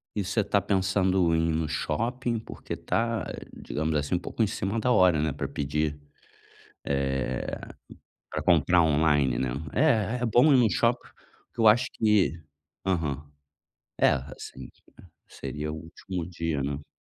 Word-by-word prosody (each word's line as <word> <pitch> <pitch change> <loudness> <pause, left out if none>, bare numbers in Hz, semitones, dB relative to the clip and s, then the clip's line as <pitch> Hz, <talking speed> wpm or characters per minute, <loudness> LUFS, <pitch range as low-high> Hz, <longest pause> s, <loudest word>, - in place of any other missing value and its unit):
E 100 - 0
você 100 +4 0
está 100 0 +1
pensando 95 -3 +2
em 80 0 +1
ir - - 0
no 80 -1 -1
shopping? 115 - -1
Porque - - -7
tá, 115 0 -1 0.3
digamos 80 +1 -3
assim, 75 +4 0
um - - 0
pouco 115 - -4
em 110 - +4
cima 100 +4 -2
da 125 +2 +1
hora, 90 -8 +5
né, 80 -1 0
pra 70 0 -4
pedir, 75 +1 -2 0.9
eh, 65 -2 -1 0.7
pra - - -3
comprar 90 -2 +4
online, 75 -5 +2
né. 65 -2 0 0.2
É, 125 -4 +2
é - - +2
bom 125 +7 +5
ir - - +7
num 120 -3 +5
shopping - - +1 0.4
porque - - -8
eu 110 - +7
acho 120 +4 +5
que 100 - +2 0.5
aham. 75 -6 -1 0.7
É, - - +5
assim, 65 +1 -6 0.6
seria 75 +1 -5
o - - -5
último 85 +2 -6
dia, 85 -5 -2
né. 70 +1 -4
85 Hz, 155 wpm, -27 LUFS, 75-105 Hz, 0.9 s, ir